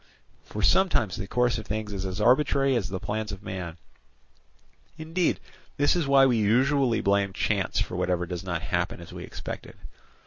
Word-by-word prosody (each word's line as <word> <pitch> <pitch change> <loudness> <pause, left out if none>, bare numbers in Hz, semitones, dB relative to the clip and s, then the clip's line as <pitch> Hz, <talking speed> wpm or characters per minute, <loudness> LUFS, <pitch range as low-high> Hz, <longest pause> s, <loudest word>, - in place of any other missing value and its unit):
For - - -5
sometimes 170 - +3
the 100 - -5
course 125 0 +1
of 110 - -10
things 105 0 -3
is 95 -1 -3
as 95 +2 -4
arbitrary 135 +3 +3
as 115 -6 -1
the 95 -1 -4
plans 110 +2 -3
of 100 0 -8
man; 90 -3 -5 1.2
indeed 165 +2 0 0.4
this 145 +3 +3
is 170 -5 0
why 135 -1 +6
we 125 -3 +3
usually 125 +3 +3
blame 100 -1 +1
chance 100 -1 0
for - - -2
whatever 90 -1 0
does 90 0 -5
not 90 -1 -3
happen 85 -3 -1
as 85 - -11
we - - -7
expected. - - -7
105 Hz, 175 wpm, -27 LUFS, 95-135 Hz, 1.2 s, why